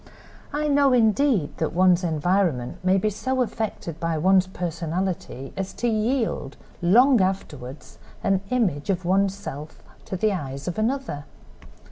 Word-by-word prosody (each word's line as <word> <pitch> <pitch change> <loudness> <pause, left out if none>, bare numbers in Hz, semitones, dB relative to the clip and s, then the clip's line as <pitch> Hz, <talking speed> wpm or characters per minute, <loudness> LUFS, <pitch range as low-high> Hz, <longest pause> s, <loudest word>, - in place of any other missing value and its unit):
I 300 +1 -1
know, 280 -2 +4
indeed, 230 - +2
that 160 - -1
one's 180 0 +4
environment 165 -5 0
may 185 +1 +3
be 210 +3 +1
so 260 +5 0
affected 215 -8 -4
by 165 -1 -1
one's 185 +3 +4
personality 170 -5 -4
as 190 0 -4
to 240 - -2
yield, 225 - -1 0.2
long 240 +7 +5
afterward, 150 -8 -3 0.4
an 195 -1 +2
image 200 - 0
of 185 -2 0
one's 195 +2 +2
self 155 -6 -8 0.2
to - - -4
the 215 +2 +1
eyes 140 -5 -5
of 180 +4 -3
another. 225 - -2
190 Hz, 140 wpm, -24 LUFS, 165-220 Hz, 0.4 s, long